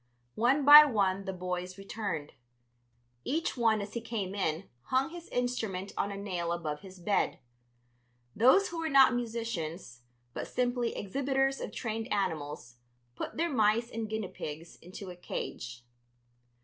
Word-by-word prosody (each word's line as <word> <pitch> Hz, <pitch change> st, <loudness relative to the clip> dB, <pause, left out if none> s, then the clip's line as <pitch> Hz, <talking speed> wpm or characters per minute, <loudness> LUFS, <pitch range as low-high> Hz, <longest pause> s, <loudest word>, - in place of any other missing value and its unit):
One 260 Hz, +5 st, +2 dB
by 295 Hz, +1 st, +12 dB
one 200 Hz, -8 st, +1 dB
the 190 Hz, -, -2 dB
boys 180 Hz, 0 st, -4 dB
returned; 195 Hz, -6 st, -4 dB, 0.9 s
each 320 Hz, -, -1 dB
one 225 Hz, -4 st, +2 dB
as 200 Hz, 0 st, -7 dB
he 235 Hz, -, -3 dB
came 210 Hz, -5 st, -4 dB
in 185 Hz, -2 st, -2 dB, 0.2 s
hung 260 Hz, +4 st, +1 dB
his 345 Hz, 0 st, -9 dB
instrument 220 Hz, -6 st, -2 dB
on 200 Hz, -, -1 dB
a 200 Hz, -, -5 dB
nail 180 Hz, -4 st, -3 dB
above 155 Hz, -3 st, -3 dB
his 190 Hz, -1 st, -12 dB
bed. 200 Hz, +3 st, +1 dB, 1.0 s
Those 260 Hz, -, +5 dB
who 340 Hz, -, -5 dB
were 325 Hz, -1 st, -1 dB
not 270 Hz, -3 st, +7 dB
musicians, 220 Hz, -, -4 dB, 0.3 s
but -, -, -4 dB
simply 245 Hz, -1 st, -1 dB
exhibitors 270 Hz, +5 st, 0 dB
of -, -, -4 dB
trained 225 Hz, 0 st, -4 dB
animals, 150 Hz, -, -2 dB, 0.4 s
put -, -, -5 dB
their 335 Hz, +1 st, 0 dB
mice 225 Hz, +1 st, +2 dB
and 225 Hz, -1 st, -4 dB
guinea 220 Hz, -3 st, -3 dB
pigs 155 Hz, +2 st, -7 dB
into 185 Hz, +2 st, -9 dB
a -, -, -9 dB
cage. 125 Hz, -8 st, -6 dB
210 Hz, 150 wpm, -31 LUFS, 180-245 Hz, 1.0 s, by